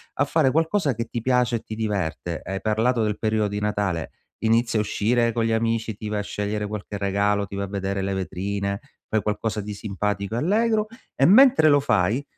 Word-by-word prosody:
a - - +2
fare 130 - +2
qualcosa 160 0 +1
che 115 +1 -3
ti 120 - -4
piace 125 -1 +2
e - - -6
ti 110 - -7
diverte. 95 -6 -3
Hai 95 +1 -4
parlato 115 +2 +1
del 105 -1 -1
periodo 110 -1 +1
di 105 0 -3
Natale? 100 -6 -1 0.3
Inizia 115 0 +2
a - - +3
uscire 115 +3 +1
con 115 0 0
gli 115 - 0
amici, 115 -1 0
ti 105 +1 -6
vai 105 - -1
a - - 0
scegliere 105 +1 -3
qualche 105 0 -5
regalo, 100 +1 +1
ti 100 - -8
vai 100 0 -2
a - - -8
vedere 100 0 -2
le 95 0 -1
vetrine, 100 +1 -3 0.3
fai 110 -1 +1
qualcosa 105 +1 -2
di 105 +1 -6
simpatico 100 +1 -3
e - - -1
allegro; 215 - +2 0.3
e 135 - +3
mentre 240 - +7
lo 145 -1 +5
fai 110 +1 +1
105 Hz, 210 wpm, -24 LUFS, 100-120 Hz, 0.3 s, mentre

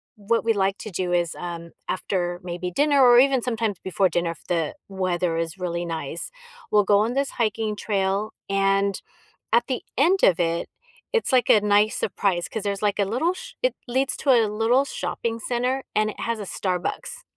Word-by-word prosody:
what 220 +3 0
we 225 - +3
like 195 -1 0
to 215 - -7
do 180 0 -2
is, 175 -2 +1
um, 170 -1 -6 0.2
after 175 -2 -2
maybe 180 0 -4
dinner 285 +5 +3
or 240 -1 +7
even 265 -1 +4
sometimes 225 -6 -2
before 190 +1 +2
dinner 175 -1 0
if 165 - -12
the 170 - -1
weather 180 -3 -1
is 165 +2 -3
really 175 -1 -3
nice, 165 -1 -4 0.4
we'll 210 -1 +4
go 200 0 +4
on 225 +3 +1
this 275 0 0
hiking 215 -2 -1
trail, 200 0 -1 0.2
and 195 0 +1 0.5
at 235 +1 +4
the 255 -2 -2 0.2
end 355 +8 +4
of 180 -2 +5
it, 170 0 0 0.4
it's, 460 - +1
like, 255 -1 +3
a 215 - +7
nice 210 +1 +3
surprise 185 -3 0
'cause 220 - -4
there's, 200 0 -2
like, 205 0 +1
a 200 - +3
little 275 - 0
sh - - -10
it - - +2
leads 260 +3 0
to 280 - -2
a 235 -4 +6
little 225 +6 +2
shopping 230 -4 -3
center 250 +3 -1
and 215 0 +2
it - - -15
has 230 -1 -2
a - - -4
Starbucks. 190 - -3
205 Hz, 195 wpm, -24 LUFS, 180-235 Hz, 0.5 s, or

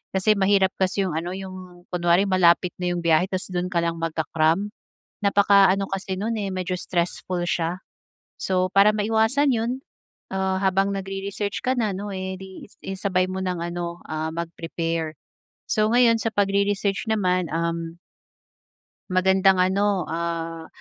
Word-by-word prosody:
kasi 190 +3 +4
mahirap 195 -1 +3
kasi 190 +1 +1
'yong 180 - -2
ano, 170 +2 -3
'yong 185 -2 -9
kunwari 175 +2 +3
malapit 180 -1 +4
na 180 - 0
'yong 175 - -1
biyahe 165 +2 +4
tapos 185 0 -3
do'n 180 0 -1
ka 175 - +1
lang 170 0 -1
magka-cram. 160 +3 0 0.6
Napaka-ano 200 -1 +4
kasi 190 -1 -3
no'n 225 +2 -1
eh, 200 -2 -2
medyo 185 0 -2
stressful 175 0 -2
siya. 170 +2 -1 0.6
So 185 -1 +1
para 200 +1 +6
maiwasan 225 +6 +2
'yon, 230 +1 0 0.6
ah, 190 0 0
habang 195 0 +2
nagre-research 195 +1 -4
ka 255 +1 +1
na, 215 -5 0
'no, 205 +2 -5
eh 190 0 -4
di 190 0 -10
i 195 -1 -8
isabay 185 -2 0
mo 190 0 -3
ng 180 -2 -2
ano, 170 0 -4
um, 155 0 -2
mag-prepare. 165 -1 -3 0.5
So, 215 0 +2
ngayon 235 -2 +5
sa 225 - 0
pagre-research 200 +1 +1
naman, 185 -5 +1
um 165 0 -2 1.1
Magandang 190 +1 +4
ano, 190 +1 +2
ah, 165 0 -4
185 Hz, 145 wpm, -24 LUFS, 170-200 Hz, 1.1 s, para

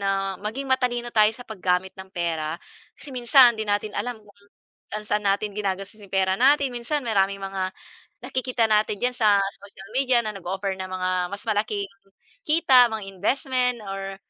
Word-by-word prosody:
na 195 -1 -1
maging 220 +7 -4
matalino 245 -2 0
tayo 215 -1 +6
sa 245 - -11
paggamit 190 -3 -1
ng 190 0 -11
pera, 165 -4 -2 0.4
kasi 280 - -10
minsan 245 0 +6
‘di 220 -2 -5
natin 205 +1 0
alam 245 -1 -3
kung 205 - -19 0.6
saan-saan 210 0 -2
natin 200 +1 0
ginagastos 200 +1 -4
yung 200 - -14
pera 190 0 +2
natin. 275 0 +4
Minsan 245 +4 -2
maraming 200 -3 +1
mga 195 -1 -3 0.6
nakikita 255 -2 0
natin 215 -1 +2
diyan 250 0 +1
sa 210 -3 +4 0.2
social 195 -1 -12
media 260 -2 +3
na 215 - -3
nag-offer 195 0 -3
ng 190 0 -5
mga 185 0 -2 0.2
mas 200 0 -6
malaking 210 -2 -1 0.6
kita, 275 -6 +5
mga 220 -2 -5
investment, 250 +4 0
or 195 0 -5
210 Hz, 165 wpm, -24 LUFS, 195-245 Hz, 0.6 s, tayo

